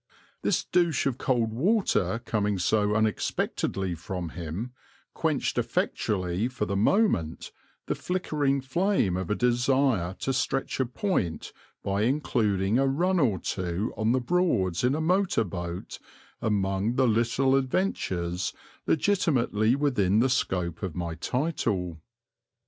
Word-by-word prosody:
This - - +1
douche 170 -5 +1
of 130 -2 -1
cold 120 -5 +1
water 125 - +1
coming 105 -3 0
so 105 +3 +1
unexpectedly 100 -3 -1
from 85 0 -5
him, 85 +9 -5 0.4
quenched - - 0
effectually 95 +1 -1
for 125 -4 -3
the 100 - -2
moment 100 - +1 0.3
the - - -1
flickering 150 -7 -1
flame 135 - +1
of 95 -2 -3
a 105 - +1
desire 125 -6 +2
to 135 - 0
stretch 135 +1 -1
a 130 - +1
point 120 - -2 0.3
by 100 +1 0
including 110 -5 +1
a 135 - +3
run 175 +7 +1
or 115 - +2
two 90 +4 -3
on 110 +1 +1
the 130 - +3
Broads 120 - +1
in 125 +3 +3
a 155 - -1
motor 180 -6 +2
boat 85 -2 -6 0.4
among 100 +1 0
the 130 -1 +3
little 120 +4 +2
adventures 95 - -1 0.3
legitimately 130 - +2
within 115 -9 +2
the 125 +4 +4
scope 90 -9 -1
of 95 -6 -4
my 85 -2 -3
title. 95 - -2
115 Hz, 130 wpm, -27 LUFS, 95-135 Hz, 0.4 s, the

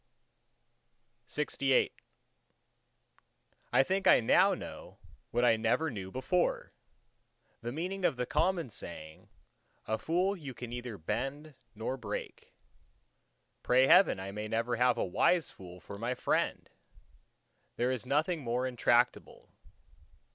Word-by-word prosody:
LXIX 135 0 +1 1.8
I - - +5
think 190 +6 0
I - - +7
know 115 - +4
now - - -9 0.3
what 120 +1 +1
I 115 -2 +5
never 115 +8 +1
knew 95 -5 -6
before—the 130 - -4
meaning 180 +7 -4
of 160 - +2
the 125 0 -2
common 170 -3 0
saying, 80 -5 -9 0.6
A 110 0 -1
fool 180 - +1
you 140 -8 -8
can 120 0 -7
neither 120 -3 -6
bend 135 - -4 0.2
nor 115 +5 -3
break. 105 -5 -7 1.1
Pray 130 +1 +4
heaven 180 - +6
I 95 +1 -5
may 105 +1 -5
never 115 +2 -1
have 125 0 +3
a - - 0
wise 165 - +2
fool 90 -1 -12
for 100 +4 -10
my 120 +3 -2
friend! - - -1 1.1
There 125 +2 0
is 130 -3 -3
nothing 150 +5 0
more 125 0 -1
intractable. 120 -1 0
125 Hz, 120 wpm, -31 LUFS, 110-150 Hz, 1.8 s, I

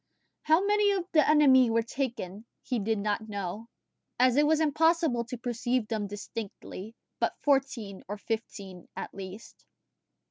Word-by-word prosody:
How 320 +5 +3
many 415 0 +3
of 375 -3 -1
the 310 -3 +4
enemy 265 -5 +6
were 230 0 +2
taken 230 -6 -4 0.2
he 250 -3 -1
did 220 +2 0
not 210 +2 -2
know, 205 +2 -5 0.5
as 250 -1 +5
it 295 +1 +4
was 315 0 +3
impossible 315 -4 +2
to 250 +1 -6
perceive 240 0 -1
them 215 -3 -2
distinctly, 205 0 -7 0.2
but - - 0
fourteen 265 -8 0
or 205 +2 -4
fifteen 200 -4 -5
at - - -5
least. 195 +2 -10
235 Hz, 145 wpm, -29 LUFS, 210-290 Hz, 0.5 s, enemy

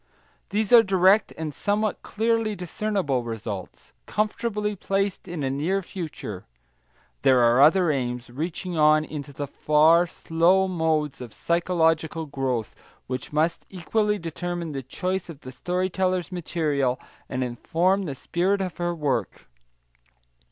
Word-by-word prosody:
These 210 +2 0
are 235 - +11
direct 195 +1 +4
and 155 -2 -4
somewhat 205 +6 -1
clearly 225 0 0
discernible 180 -6 -1
results, 105 - -7
comfortably 210 -1 -1
placed 195 0 -2
in 170 -4 -4
a 135 - 0
near 175 +8 0
future. 155 - -7 0.7
There 130 -2 +5
are 120 +2 +5
other 165 +3 +5
aims, 125 -3 -3
reaching 170 +6 -4
on 155 0 +5
into 145 -2 -7
the 145 +1 -4
far, 155 +5 +4
slow 170 +4 +2
modes 160 -6 0
of 120 -3 -8
psychological 165 -2 +1
growth, 130 -6 -2 0.3
which 130 0 -5
must 155 +3 0
equally 210 +3 0
determine 170 -1 -4
the 135 -2 -4
choice 180 +8 -3
of 150 -4 -10
the 130 - -9
story 180 +8 -1
teller's 185 0 0
material 150 -7 -1 0.3
and 130 0 -1
inform 175 +10 0
the 140 -5 -4
spirit 185 +8 0
of 185 -3 -4
her 175 0 -1
work. 135 - -2
165 Hz, 135 wpm, -25 LUFS, 140-190 Hz, 0.7 s, are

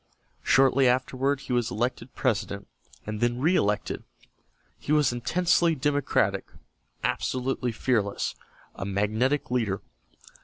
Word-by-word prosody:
Shortly 135 0 +4
afterward 130 +2 +1
he 125 - -4
was 120 -2 +1
elected 120 +4 -3
President, 100 -5 -1 0.4
and 105 +1 -4
then 120 0 +1
reëlected. 130 - +1 0.8
He - - -5
was 150 -4 +4
intensely 170 +6 +2
democratic, 145 0 +1 0.6
absolutely 125 -1 -1
fearless, 110 -3 0 0.4
a - - -6
magnetic 110 +9 0
leader. 110 -6 0
125 Hz, 105 wpm, -27 LUFS, 110-135 Hz, 0.8 s, Shortly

